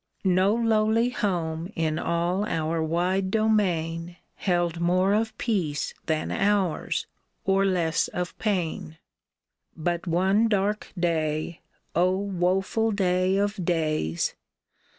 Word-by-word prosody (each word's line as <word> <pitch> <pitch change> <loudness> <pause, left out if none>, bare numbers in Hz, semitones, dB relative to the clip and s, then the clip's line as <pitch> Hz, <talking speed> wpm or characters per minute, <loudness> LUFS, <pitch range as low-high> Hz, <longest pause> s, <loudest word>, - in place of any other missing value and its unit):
No 190 +3 +3
lowly 225 0 +2
home 175 -5 -2
in 160 -1 0
all 175 +3 0
our 160 0 -1
wide 180 +4 0
domain 175 -6 0 0.2
Held 175 -3 0
more 185 +3 +3
of 220 +1 0
peace 170 -11 -1
than 155 -2 -1
ours, 200 -5 0 0.4
or 195 0 +3
less 175 -4 +1
of 180 -1 -4
pain. 175 -6 -2 0.8
But 175 +2 -2
one 190 +6 +3
dark 210 0 0
day 160 -1 -1 0.2
— - - -43
O, 185 +2 +3
woeful 195 +3 0
day 185 -2 +1
of 205 -1 -1
days. 155 - 0
180 Hz, 110 wpm, -26 LUFS, 165-200 Hz, 0.8 s, No